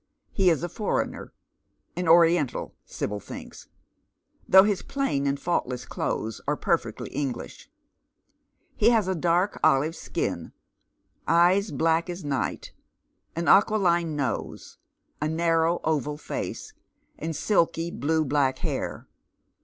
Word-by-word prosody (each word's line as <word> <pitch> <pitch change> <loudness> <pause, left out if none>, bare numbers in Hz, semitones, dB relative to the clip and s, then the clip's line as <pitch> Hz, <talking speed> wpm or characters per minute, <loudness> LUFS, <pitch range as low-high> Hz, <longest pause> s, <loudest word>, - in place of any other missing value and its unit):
He 190 -3 +3
is 165 -1 +1
a - - -1
foreigner 205 +5 -3 0.3
— - - -47
an 180 - -2
Oiiental 165 -4 +3
— - - -49
Sibyl 105 0 -4
thinks, - - -10 0.8
though 190 0 +9
his 205 -2 0
plain 270 - -1
and 140 0 -1
fault 170 -5 0
less 125 -1 -5
clothes 110 -1 -3
are - - 0
perfectly - - -1
English. 135 -5 -5 1.1
He 220 - +4
has 225 -5 +2
a 190 - +1
dark 175 +3 +1
olive 150 +5 +3
skin, - - -4 0.7
eyes 180 +5 +4
black 165 +4 +1
as 175 -2 -6
night, 140 -2 -3 0.6
an 170 0 -2
aquiline 175 -6 +3
nose, 140 -3 -4 0.4
a 150 - +1
narrow 165 +1 +1
oval 150 -2 -1
face, 435 - -6 0.5
and 160 0 -4
silky 170 -1 +1
blue 160 +1 0
black 140 -2 +1
hair. - - -4
165 Hz, 130 wpm, -26 LUFS, 145-180 Hz, 1.1 s, though